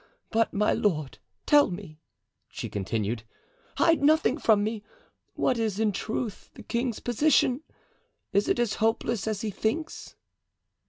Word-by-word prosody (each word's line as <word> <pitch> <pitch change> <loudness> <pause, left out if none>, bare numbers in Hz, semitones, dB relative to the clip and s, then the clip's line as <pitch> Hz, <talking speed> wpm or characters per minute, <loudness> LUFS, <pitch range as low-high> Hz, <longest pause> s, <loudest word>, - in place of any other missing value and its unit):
But 225 0 +2
my 210 +1 +2
lord, 155 -9 -1 0.3
tell 290 -4 +5
me," 175 -4 -8 0.5
she - - -6
continued, 105 +3 -2 0.6
"hide 330 -2 +4
nothing 305 -1 +3
from 215 -5 +4
me—what 230 - -4
is, 215 -3 -1
in 220 -1 +2
truth, 215 +2 -4
the - - -11
king's 235 -1 -2
position? 255 +1 +2 0.7
Is 200 +1 +2
it - - +2
as 240 -3 +1
hopeless 225 -1 0
as 215 -2 -1
he 220 - -2
thinks?" 305 - -3
220 Hz, 130 wpm, -27 LUFS, 200-250 Hz, 0.7 s, tell